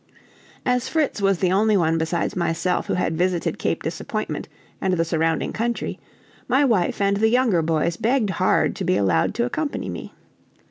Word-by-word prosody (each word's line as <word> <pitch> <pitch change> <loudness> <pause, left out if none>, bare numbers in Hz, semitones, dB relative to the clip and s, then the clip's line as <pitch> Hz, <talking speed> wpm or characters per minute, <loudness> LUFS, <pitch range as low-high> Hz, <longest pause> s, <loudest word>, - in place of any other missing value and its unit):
As 250 0 +1
Fritz 305 -9 0
was 195 -1 +3
the 180 0 +1
only 210 +2 +3
one 165 -2 +2
besides 165 +1 -1
myself 170 0 0
who - - 0
had 170 -2 0
visited 175 0 0
Cape - - -1
Disappointment - - -4 0.3
and 190 - +1
the 165 -1 +1
surrounding 165 -1 0
country, 235 +1 -2 0.5
my 265 +4 +3
wife 210 -9 +1
and 200 0 +2
the 220 +2 +3
younger 235 -7 +3
boys 165 +1 0
begged 225 -2 +1
hard 185 +1 +1
to - - -3
be 185 +1 +2
allowed 95 -5 +1
to 235 - +1
accompany 295 +4 -3
me. - - -7
185 Hz, 175 wpm, -23 LUFS, 165-230 Hz, 0.5 s, was